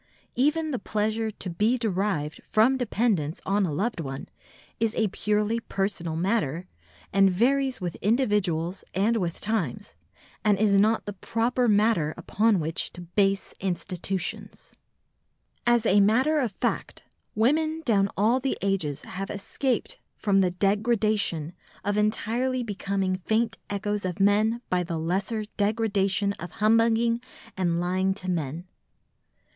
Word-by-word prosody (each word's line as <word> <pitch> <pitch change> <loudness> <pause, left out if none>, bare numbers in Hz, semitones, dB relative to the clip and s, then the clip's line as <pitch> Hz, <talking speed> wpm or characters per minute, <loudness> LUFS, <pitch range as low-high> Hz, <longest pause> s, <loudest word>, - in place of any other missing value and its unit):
Even 305 +5 +1
the 255 - -2
pleasure 220 +2 -1
to 205 -2 -6
be 210 +8 +1
derived 190 -9 -1
from 225 +5 +3
dependence 210 - 0
on 195 0 +2
a - - -3
loved 200 +7 -1
one 135 -4 -5 0.5
is 225 -1 0
a 220 -2 +1
purely 210 +3 0
personal 195 -7 -2
matter, 180 -3 0 0.5
and 195 0 +5
varies 260 +6 +1
with 175 -3 -3
individuals 200 -6 0
and 215 +5 +2
with 175 -5 -2
times, 205 - -2 0.5
and 210 -2 +3
is 210 0 +3
not 215 +3 +3
proper 240 +2 +1
matter 205 -7 +2
upon 215 -2 +2
which 160 +1 -2
to 175 - -9
base 195 +3 0
institutions. 185 0 -4 0.9
As 240 -1 +4
a 205 -1 +5
matter 255 +10 +3
of 245 -6 0
fact, - - -3 0.3
women 310 +8 +1
down 200 -4 +3
all 225 +6 +3
the 265 +1 -1
ages 180 -8 -1
have 195 +1 -6
escaped 260 - -2 0.2
from 195 -2 +2
the 185 - +3
degradation 205 -4 +1 0.3
of 205 0 0
entirely 230 +4 0
becoming 195 -3 -1
faint 225 0 +1
echoes 205 0 -2
of 180 -1 -3
men 215 +4 +3
by 180 -1 +1
the 170 -1 -3
lesser 195 +7 -1
degradation 200 -2 +1
of 175 +1 -7
humbugging 230 +2 +3 0.3
and 175 -3 0
lying 185 +2 0
to 185 -2 -3
men. 165 0 -3
205 Hz, 135 wpm, -26 LUFS, 185-225 Hz, 0.9 s, and